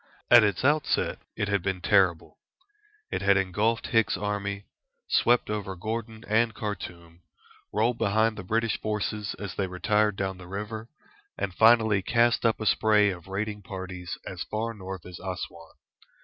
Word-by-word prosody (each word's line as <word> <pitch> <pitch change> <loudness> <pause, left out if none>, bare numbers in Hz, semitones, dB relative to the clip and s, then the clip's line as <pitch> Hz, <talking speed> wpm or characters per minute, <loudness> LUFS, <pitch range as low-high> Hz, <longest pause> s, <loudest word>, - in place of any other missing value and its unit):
At 120 -2 +9
its 105 +3 0
outset 150 0 +1 0.2
it 100 - 0
had 100 -2 +1
been 95 0 -2
terrible. 90 - +2 0.7
It - - -2
had 100 0 +4
engulfed 105 +5 0
Hicks's 115 -2 +2
army, 100 -1 -3 0.4
swept 120 0 +3
over 100 -3 -3
Gordon 110 +3 -5
and 110 +1 +2
Khartoum, 85 -5 -6 0.5
rolled 115 +3 +1
behind 110 +2 +2
the 105 - -7
British 115 +3 0
forces 105 -1 -2
as 100 -3 -6
they 95 - -1
retired 105 +3 +1
down 95 -1 -3
the 90 - -11
river, 105 +4 -6 0.5
and 95 - -3
finally 110 0 +5
cast 120 +3 +3
up 115 - 0
a 110 - -4
spray 105 0 +4
of 90 0 -9
raiding 105 +2 -3
parties 95 -1 -6
as 95 -1 -6
far 115 +2 -3
north 95 -3 -8
as 90 -1 -9
Assouan. 90 -3 -7
105 Hz, 155 wpm, -27 LUFS, 95-110 Hz, 0.7 s, At